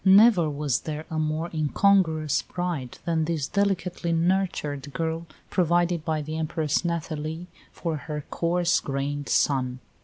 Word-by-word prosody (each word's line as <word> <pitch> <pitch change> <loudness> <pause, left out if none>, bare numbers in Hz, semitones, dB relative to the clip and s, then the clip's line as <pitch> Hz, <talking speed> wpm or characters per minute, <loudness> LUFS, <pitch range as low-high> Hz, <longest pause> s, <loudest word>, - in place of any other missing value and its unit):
Never 195 -3 +7
was 145 -3 0
there 155 0 -5
a 160 - -1
more 155 +2 -1
incongruous 160 -1 +3
bride 175 -9 -4
than 160 -2 +1
this 155 -4 -1
delicately 185 -4 0
nurtured 165 -5 0
girl 165 0 -2 0.2
provided 175 -1 +2
by 155 -2 -1
the 155 +2 -4
Empress 155 -1 0
Nathalie 160 -1 -3 0.3
for 165 -3 -3
her 150 0 -5
coarse 175 +1 +2
grained 140 +1 -3
son. 130 -3 +2
160 Hz, 130 wpm, -26 LUFS, 150-175 Hz, 0.3 s, Never